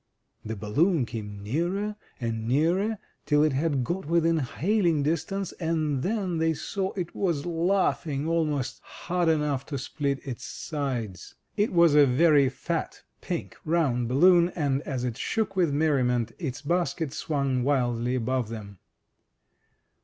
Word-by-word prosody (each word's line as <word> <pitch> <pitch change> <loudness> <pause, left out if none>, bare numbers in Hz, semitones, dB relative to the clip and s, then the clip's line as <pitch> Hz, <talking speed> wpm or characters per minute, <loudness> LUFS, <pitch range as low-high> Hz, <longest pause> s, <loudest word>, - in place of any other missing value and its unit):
The 110 +1 -4
balloon 130 - +1
came 105 -4 -7
nearer 175 - -1 0.2
and 115 -2 -3
nearer, 175 - +2 0.3
till 150 0 +4
it 155 -2 +2
had 140 -1 +1
got 175 +4 -3
within 165 0 +3
hailing 165 - +1
distance, 170 +5 -1
and 155 -5 0
then 190 - -1
they 160 0 +2
saw 195 +4 -3
it 180 -3 -4
was 170 -7 0
laughing 170 -4 0
almost 150 -6 0
hard 175 -1 -2
enough 150 -4 +1
to 145 - -3
split 140 +1 -2
its 130 -4 -6
sides. 120 - -4 0.2
It 210 +1 +1
was 170 -3 +5
a 145 -1 +7
very 140 +1 +4
fat, 160 +6 -4 0.2
pink, 175 -2 -4
round 145 -8 +1
balloon, 170 +7 +5
and 140 -4 0
as 130 -4 -2
it 125 -1 -3
shook 210 -3 -1
with 175 -5 +2
merriment, 130 -6 +1
its 140 -5 -4
basket 170 -1 0
swimg 140 -4 -1
wildly 125 -2 +1
above 125 -1 -1
them. 100 -4 -8
150 Hz, 140 wpm, -27 LUFS, 130-170 Hz, 0.3 s, a